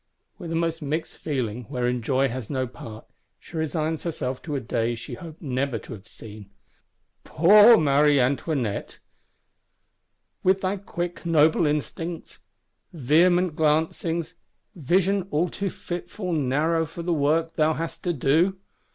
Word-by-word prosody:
With 170 -4 -6
a - - -1
most 165 0 -1
mixed 155 +3 -4
feeling, 125 -6 -3
wherein 125 -1 -1
joy 130 +4 +1
has 125 -3 -6
no 130 -2 -1
part, 115 -3 -10 0.3
she - - -14
resigns 160 0 -1
herself 130 -6 -4
to 150 -4 -4
a - - 0
day 115 0 -1
she 115 0 -9
hoped 165 -2 -10
never 135 -2 -1
to 115 - -9
have 105 0 -12
seen. 105 -3 -12 0.7
Poor 210 - +7
Marie 145 -1 +4
Antoinette; 130 -3 -1 1.4
with 190 +1 +2
thy 190 +2 -1
quick 175 -2 -5
noble 160 -1 +3
instincts; 165 +3 -4 0.5
vehement 170 +3 +3
glancings, 160 +2 0 0.4
vision 185 - +1
all 165 +3 +1
too 200 +3 -3
fitful 180 +2 -5
narrow 155 +3 +1
for 170 +2 -8
the 175 0 0
work 160 +2 +1
thou 155 0 +2
hast 165 +1 -5
to 175 - 0
do! 160 +7 +2
155 Hz, 140 wpm, -25 LUFS, 130-170 Hz, 1.4 s, Poor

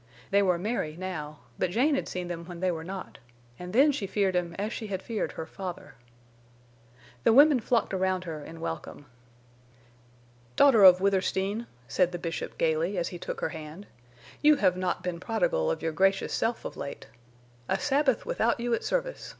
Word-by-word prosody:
They 200 +1 +5
were 180 -3 +2
merry 180 -5 -2
now; 155 -5 -6 0.2
but 185 - +1
Jane 255 - +2
had 275 - -1
seen 180 -1 -4
them 170 -1 -5
when 175 -1 -9
they 185 0 +1
were 160 -2 -5
not, 190 +2 -7 0.4
and 180 0 -7
then 275 +8 +5
she 240 -8 -3
feared 195 -1 0
him 175 -1 -1
as 210 +3 -2
she 220 - -5
had 190 -2 -3
feared 225 -3 -3
her 160 - -5
father. 180 +1 -7 1.3
The - - +5
women 285 +2 +7
flocked 230 -2 0
around 185 -1 0
her 160 -4 -6
in 165 +1 -10
welcome. 165 -3 -6 1.5
"Daughter 260 -8 +6
of 185 -1 +9
Withersteen," 195 +3 0 0.2
said 180 +3 +1
the - - -2
Bishop, 165 -1 -5
gaily, 165 +4 +1
as 175 - -1
he 175 - -8
took - - -5
her - - 0
hand, 160 +4 -9 0.6
"you 300 0 +6
have 185 -10 +2
not 185 -1 -2
been 180 -2 -3
prodigal - - 0
of - - -2
your 160 - 0
gracious 195 +4 +1
self 230 0 -1
of - - -5
late. 140 - -7 0.6
A 190 - +2
Sabbath 275 +4 +1
without 235 +1 0
you 240 0 -1
at - - 0
service! - - -2
190 Hz, 185 wpm, -28 LUFS, 175-230 Hz, 1.5 s, of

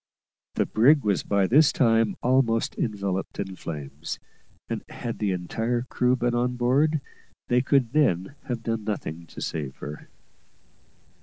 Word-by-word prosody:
The - - +2
brig 140 +7 +4
was 100 -3 +1
by 100 -1 +1
this 145 +9 +5
time 115 -3 +3
almost 120 -3 +2
enveloped 100 -4 -2
in 95 -1 -3
flames, 75 -2 -6 0.5
and - - -4
had 115 -1 -5
the 105 -2 0
entire 115 +7 -1
crew 125 0 +1
been 120 -1 0
on 125 +1 0
board, 140 +5 +2 0.5
they 125 0 +4
could 130 -2 +2
then 130 - +2
have 120 -4 -4
done 115 -2 -2
nothing 85 -6 -4
to - - -11
save 70 -5 -3
her. 75 +1 -8
115 Hz, 145 wpm, -26 LUFS, 95-125 Hz, 0.5 s, this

